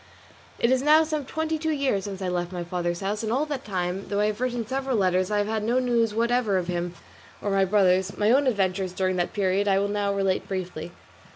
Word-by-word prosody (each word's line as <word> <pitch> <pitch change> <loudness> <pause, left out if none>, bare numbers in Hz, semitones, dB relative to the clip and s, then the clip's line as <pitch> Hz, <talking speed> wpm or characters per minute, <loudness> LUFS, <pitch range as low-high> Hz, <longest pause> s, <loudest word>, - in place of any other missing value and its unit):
It 235 - +2
is 260 -1 +3
now 305 +3 +6
some 305 -3 -3
twenty 315 +2 -2
two 320 +1 -1
years 275 -10 0
since 195 -1 -5
I - - -1
left 175 0 -2
my 175 -1 -4
father's 175 0 -3
house, 205 +2 -2
and 220 -1 -2
all 270 +5 +1
that 285 -3 -4
time, 185 -1 -3
though 205 - -1
I 210 - +3
have 215 +2 -2
written 245 -2 -1
several 265 +1 -1
letters, 185 -1 +2
I 210 - 0
have 205 - +1
had 220 0 -1
no 235 +3 +1
news 240 -3 +2
whatever 230 -2 +1
of 180 - -1
him 175 0 -3 0.4
or 205 - -3
of - - 0
my 195 0 +3
brothers; 190 -1 +2
my 210 +1 +3
own 275 +2 +4
adventures 190 -5 0
during 185 0 0
that 175 - -1
period 200 0 +1
I 195 -1 +4
will 200 +1 +1
now 205 -1 0
relate 195 -1 0
briefly. 180 -3 -5
205 Hz, 245 wpm, -25 LUFS, 185-245 Hz, 0.4 s, now